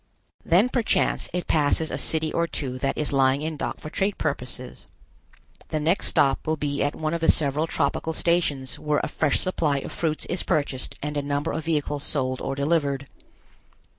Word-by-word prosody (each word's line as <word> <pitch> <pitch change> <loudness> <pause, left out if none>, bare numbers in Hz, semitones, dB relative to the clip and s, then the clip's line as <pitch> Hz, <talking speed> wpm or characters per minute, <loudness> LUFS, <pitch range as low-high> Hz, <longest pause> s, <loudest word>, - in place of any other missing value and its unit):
Then 180 +8 +4
perchance 240 -3 +1
it 180 0 -2
passes 155 +1 +2
a - - -2
city 160 -1 +1
or 170 0 +1
two 130 -5 -4
that 135 +1 -1
is 150 -1 -1
lying 135 +1 +3
in 160 0 -2
dock - - -4
for 155 - -8
trade 195 +1 0
purposes. 125 -4 -4 0.8
The 155 - -1
next 165 +6 +1
stop 135 +1 +2
will 155 0 +1
be 145 -1 -2
at 145 +1 0
one 155 0 -2
of 170 - -2
the 165 - +2
several 150 +2 +1
tropical 160 +1 0
stations 145 -7 0
where 150 -1 +1
a - - 0
fresh 150 -3 +1
supply 160 -6 0
of 135 - -5
fruits 155 -2 -1
is 180 - -1
purchased 145 -6 -1
and 150 0 -2
a - - +1
number 145 +2 -1
of 155 0 -4
vehicles 150 -3 -1
sold 130 -3 -1
or 135 - -2
delivered. 140 -2 0
150 Hz, 190 wpm, -25 LUFS, 140-160 Hz, 0.8 s, Then